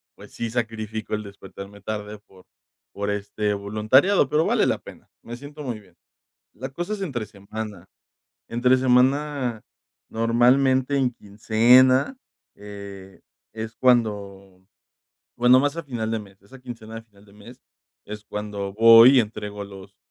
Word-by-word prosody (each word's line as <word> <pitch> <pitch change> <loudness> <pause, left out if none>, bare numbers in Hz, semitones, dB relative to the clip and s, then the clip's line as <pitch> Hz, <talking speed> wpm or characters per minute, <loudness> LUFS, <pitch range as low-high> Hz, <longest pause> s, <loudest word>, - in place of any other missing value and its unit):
pues, - - -15
sí 115 -1 -4
sacrifico 110 -2 -4
el 105 - -5
despertarme 100 0 -11
tarde, 105 0 -6
por 95 -1 -20 0.5
por 100 0 -3
este 105 +1 -2
voluntariado, 110 - +2
pero, 155 +3 +2
vale - - +2
la - - +1
pena. - - -14 0.2
Me 120 - -8
siento 145 +3 -10
muy 120 -5 -5
bien. 95 -4 -22 0.6
La 130 - -7
cosa 175 +9 -5
es 205 - -5
entre 135 - -3
semana, 100 -1 -8 0.6
entre 125 +2 +2
semana, 130 -1 +1 0.5
normalmente 130 +4 +2
en 125 -2 +1
quincena, 120 - +3 0.4
eh, 100 -2 -11 0.3
es 110 +1 -7
cuando, 100 -6 0 0.7
bueno, 125 +1 +6
más 145 +3 -1
a - - -3
final 120 -5 -4
de 110 - -1
mes, 100 -1 -16
esa 130 +7 -16
quincena 115 -3 -9
a - - -11
final 105 -2 -23
de 100 - -20
mes, 115 +5 -15 0.4
es 105 0 -8
cuando 105 -2 -5
voy, 115 +4 +8
y - - +7
entrego 105 -2 -5
los 100 0 -13
110 Hz, 145 wpm, -23 LUFS, 100-125 Hz, 0.7 s, voy